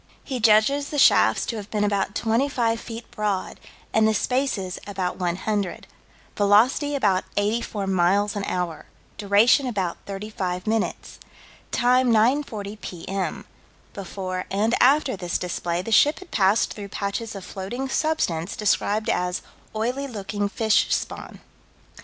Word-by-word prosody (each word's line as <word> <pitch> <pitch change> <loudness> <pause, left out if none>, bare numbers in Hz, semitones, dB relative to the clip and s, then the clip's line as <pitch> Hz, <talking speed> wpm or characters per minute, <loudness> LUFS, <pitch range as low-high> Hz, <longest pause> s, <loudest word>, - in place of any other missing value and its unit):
He 260 -3 -4
judges 230 +6 +4
the 295 - -4
shafts 110 - +5
to 230 - -3
have 205 -1 -7
been 210 -1 0
about 200 0 0
25 230 0 +1
feet 230 0 -9
broad, 205 -3 -2 0.3
and 220 0 +4
the 220 - +2
spaces 220 -6 -1
about 190 -3 -3
100. 185 +2 -2 0.5
Velocity 230 +8 +3
about 200 -8 +2
84 210 0 -1
miles 195 +2 +2
an 205 - -2
hour. 175 -3 -3 0.3
Duration 215 +7 +4
about 190 -8 -2
35 195 -3 -4
minutes. 220 0 -2 0.5
Time 250 +1 +3
9:40 220 -3 +1
P.M. 185 +2 -4 0.5
Before 185 -2 -5
and 210 +4 +1
after 270 -1 +4
this 175 -2 -2
display 175 0 -3
the 225 - -6
ship 290 +7 +5
had 375 -2 -13
passed 195 +2 +2
through 205 -2 -7
patches 205 +3 -4
of 195 -2 -7
floating 240 +8 -5
substance 200 - -1
described 210 0 0
as 180 0 -1 0.3
"oily 250 +6 -1
looking 205 -3 -3
fish 220 +1 +2
spawn." - - -3
210 Hz, 135 wpm, -24 LUFS, 190-235 Hz, 0.5 s, shafts